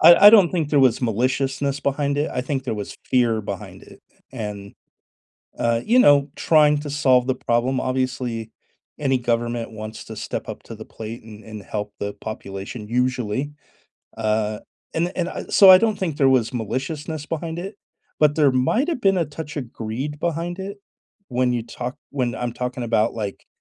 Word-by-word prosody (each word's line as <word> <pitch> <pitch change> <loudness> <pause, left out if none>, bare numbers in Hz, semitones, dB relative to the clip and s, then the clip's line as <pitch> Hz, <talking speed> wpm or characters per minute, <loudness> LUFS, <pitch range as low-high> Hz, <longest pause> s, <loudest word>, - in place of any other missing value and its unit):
I 170 +5 +9
I - - +10
don't 200 -7 +7
think 160 -5 -1
there 145 -2 +4
was 130 -1 +3
maliciousness 135 +4 0
behind 140 0 0
it, 145 - 0
I - - -1
think 135 +1 -3
there - - -2
was 105 -1 -6
fear 120 -3 +2
behind 100 -2 -7
it, - - -15 0.3
and, 105 -4 -6 0.8
uh, 115 0 +1
you 245 +3 +4
know, 145 - +6
trying 150 -2 +4
to 145 -1 -6
solve 130 -3 +3
the 130 - +1
problem, 125 +1 0
obviously, 130 -3 -2 0.5
any 135 -3 +1
government 120 -1 -1
wants 110 0 -7
to - - -9
step - - -5
up - - -7
to - - -9
the - - -9
plate 110 +1 -8
and 110 -1 -12
and 110 -2 -9
help 105 +1 -5
the 100 0 -3
population, 105 +1 -7
usually. 125 +2 -1 0.6
Uh, 110 -1 0 0.3
and 175 +3 0
and 175 -1 0
I - - -6
so 195 -2 +7
I 185 - +10
don't 220 -1 +1
think 165 -6 -2
there 135 -2 +4
was 130 -2 +2
maliciousness 145 +7 -4
behind 165 +1 -4
it, 195 +3 -6 0.4
but 150 -1 +4
there 145 -3 +5
might've 245 - +1
been 195 -3 +3
a 170 - +2
touch 150 0 -8
of 125 -5 -5
greed 130 +7 -5
behind 170 +1 -2
it, 200 +1 -6 0.5
when 125 0 +1
you 120 -2 -1
talk 125 +3 -6
when 125 -4 -1
I'm 120 -1 -3
talking 125 +1 -4
about, 115 -1 +1
like, 105 -3 -5
130 Hz, 185 wpm, -22 LUFS, 115-150 Hz, 0.8 s, I